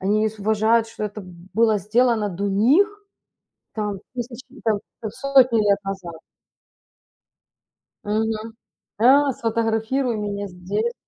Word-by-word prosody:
Они 205 +3 +1
не 220 0 +2
с 215 -1 -12
уважают, 220 +2 +2
что 220 -1 -5
это 210 +1 -5 0.3
было 220 -2 +3
сделано 220 +1 +2
до 200 +2 -3
них 255 - +4 0.9
там 210 -3 -3 0.2
тысячи 245 +1 -6
и 270 - -15
там 220 -3 +1 0.2
хоть 220 -1 -5
сотни 265 -4 +4
лет 200 0 +4
назад. 190 -3 -6 1.9
Мгм. 220 +1 -2 0.4
Да, 275 +4 +5
сфотографируй 230 +2 -1
меня 205 -1 -3
здесь. 200 +6 -3
220 Hz, 125 wpm, -22 LUFS, 205-235 Hz, 1.9 s, Да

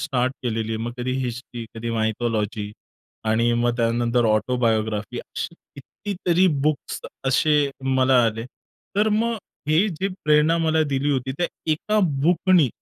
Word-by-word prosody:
Start 130 -3 0
केलेली 115 -2 -2
आहे, - - -1
मग 120 +1 -3
कधी 130 +1 -2
हिस्ट्री, 120 -1 -6
कधी 115 +1 -4
मायथॉलॉजी 110 -2 -1 0.6
आणि 115 +2 +2
मग 120 0 +1
त्यानंतर 120 0 +1
ऑटोबायोग्राफी, 110 -1 0
असे - - -6 0.2
किती 200 +9 -7
तरी 180 +2 +5 0.2
बुक्स 155 -2 -1 0.3
असे 145 +2 +3
मला 130 -1 +4
आले. 115 0 -2 0.5
तर 210 +2 +4
मग 225 +2 +1 0.3
हे 165 +7 +4
जे 190 +1 -2 0.2
प्रेरणा 150 +2 +4
मला 160 -1 +2
दिली 140 +2 +1
होती 130 -1 -1
त्या 175 - +2 0.3
1 210 +7 0 0.2
बुकनी, 175 -2 +4
125 Hz, 140 wpm, -23 LUFS, 115-155 Hz, 0.6 s, तरी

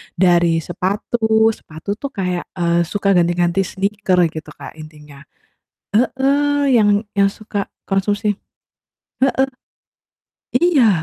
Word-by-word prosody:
dari 170 -2 +3
sepatu, 220 +4 +1
sepatu 160 -3 -12
tuh 280 - -4
kayak, 180 -2 -2 0.2
eee, 170 0 +2
suka 200 +2 -1
ganti-ganti 175 +1 +2
sneaker, 195 -1 -1
gitu, 155 -1 -8
Kak, - - -9
intinya. 150 -2 -13 0.8
Heeh, 280 +3 +2
yang 210 -1 +4 0.3
yang 195 0 +4
suka 205 -1 -5 0.2
konsumsi 205 +1 0 0.9
heeh. 265 0 +2 1.1
Iya, 250 - +3
200 Hz, 105 wpm, -19 LUFS, 175-225 Hz, 1.1 s, yang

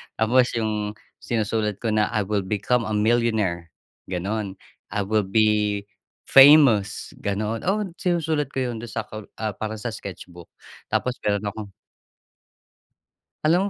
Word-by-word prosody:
Tapos 120 +3 +3
'yong 105 -2 -2 0.2
sinusulat 110 -2 -1
ko 115 - 0
na, 105 0 +2
"I 105 - +2
will 100 -1 -1
become 110 +4 0
a 110 - -1
millionaire!" 105 -6 +1 0.3
"gano'n, 95 +2 -3 0.4
"I 105 - 0
will 105 +1 +1
be, 105 0 +2 0.4
famous." 135 -8 +6
ganoon. 105 +3 -2
Oo, 200 -1 0
sinusulat 160 -5 0
ko 135 - 0
'yon, 115 - -6
do'n 120 - -7
sa 110 - -3
kol 110 -1 -9
ah, 110 -1 -3
parang 110 +2 -5
sa 120 - -3
sketch 95 -4 -8
book. 85 -1 -13 0.4
Tapos 125 0 -1
meron 100 0 +1
akong 105 0 -5 1.8
Alam 180 +6 +3
110 Hz, 140 wpm, -24 LUFS, 105-120 Hz, 1.8 s, famous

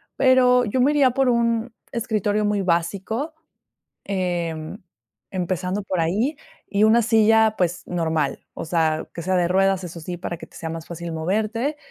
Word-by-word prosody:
pero 250 -1 +5
yo 245 +4 0
me 280 +3 +4
iría 275 -4 +4
por 270 +1 +1
un 235 0 +1 0.2
escritorio 215 -2 0
muy 205 -1 +1
básico, 195 - -1 0.7
eh, 175 -4 -1 0.8
empezando 185 +1 -2
por 185 -2 -3
ahí, 215 - 0 0.3
y 205 +1 +2
una 225 +2 +5
silla, 220 0 +4
pues 180 0 0
normal, 160 -4 -1
o - - -5
sea, 160 -2 0
que 170 - -5
sea 185 +2 +1
de 175 -1 +2
ruedas, 195 0 +2
eso 170 -1 -7
sí, 175 +2 -5
para 175 -1 -4
que - - -10
te - - -18
sea 165 - -5
más 165 0 -6
fácil 170 0 -6
moverte. 215 - -1
195 Hz, 165 wpm, -23 LUFS, 170-230 Hz, 0.8 s, pero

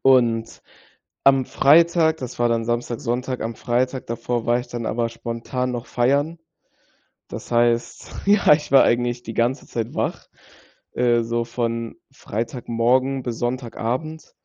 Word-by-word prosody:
Und 120 -4 +2 0.6
am 135 -1 +5
Freitag, 160 +2 +4
das 125 -1 -7
war 120 0 +2
dann 115 -1 0
Samstag, 120 0 -2
Sonntag 125 +2 -2
am 115 0 -3
Freitag 125 +3 -1
davor 115 0 -3
war 120 +1 +2
ich - - -11
dann 120 -1 -5
aber 115 +1 -1
spontan 115 +2 -4
noch 120 0 -5
feiern. 140 +7 +1 0.9
Das - - -8
heißt, 120 0 +1
ja, 200 -4 +4
ich 150 -1 -2
war 135 - +8
eigentlich 120 0 0
die 115 - -7
ganze 120 +4 0
Zeit 115 -1 -4
wach, - - -2 0.7
äh, 120 -1 +2
so 115 0 -1
von 115 -1 -3 0.2
Freitagmorgen 125 +3 -1
bis 120 -2 -4
Sonntagabend. 125 +5 -3
120 Hz, 140 wpm, -22 LUFS, 115-130 Hz, 0.9 s, war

